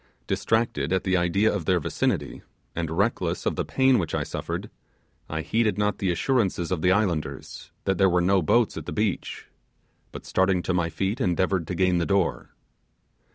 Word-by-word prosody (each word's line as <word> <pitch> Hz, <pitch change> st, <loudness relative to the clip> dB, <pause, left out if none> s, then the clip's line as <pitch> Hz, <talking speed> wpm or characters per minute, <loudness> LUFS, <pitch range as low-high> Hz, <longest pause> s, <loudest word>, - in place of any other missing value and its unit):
Distracted 110 Hz, -11 st, 0 dB
at 95 Hz, -1 st, +1 dB
the 95 Hz, -1 st, +1 dB
idea 95 Hz, +5 st, +2 dB
of 95 Hz, -6 st, -3 dB
their 90 Hz, 0 st, +3 dB
vicinity, 75 Hz, -, -2 dB, 0.3 s
and 85 Hz, -1 st, -2 dB
reckless 80 Hz, -, -1 dB
of -, -, 0 dB
the -, -, -1 dB
pain 130 Hz, -2 st, +3 dB
which 85 Hz, -4 st, -2 dB
I -, -, 0 dB
suffered, -, -, -5 dB, 0.6 s
I 80 Hz, 0 st, -2 dB
heeded 110 Hz, +3 st, +1 dB
not 105 Hz, 0 st, 0 dB
the 95 Hz, -, 0 dB
assurances 95 Hz, -4 st, 0 dB
of 90 Hz, -4 st, -1 dB
the 90 Hz, -, +3 dB
islanders, 85 Hz, -9 st, -2 dB, 0.2 s
that 95 Hz, -2 st, 0 dB
there 95 Hz, -1 st, +5 dB
were 90 Hz, 0 st, +2 dB
no 95 Hz, +2 st, +3 dB
boats 115 Hz, +8 st, +2 dB
at -, -, -7 dB
the -, -, -4 dB
beach, 105 Hz, -3 st, -2 dB, 0.7 s
but -, -, -9 dB
starting 95 Hz, -1 st, +1 dB
to 95 Hz, -, -1 dB
my 85 Hz, -2 st, +1 dB
feet 95 Hz, -, -2 dB
endeavoured 90 Hz, -4 st, +1 dB
to 90 Hz, -, -3 dB
gain 90 Hz, 0 st, +2 dB
the 85 Hz, -, -1 dB
door. 90 Hz, -11 st, 0 dB
95 Hz, 185 wpm, -25 LUFS, 85-100 Hz, 0.7 s, there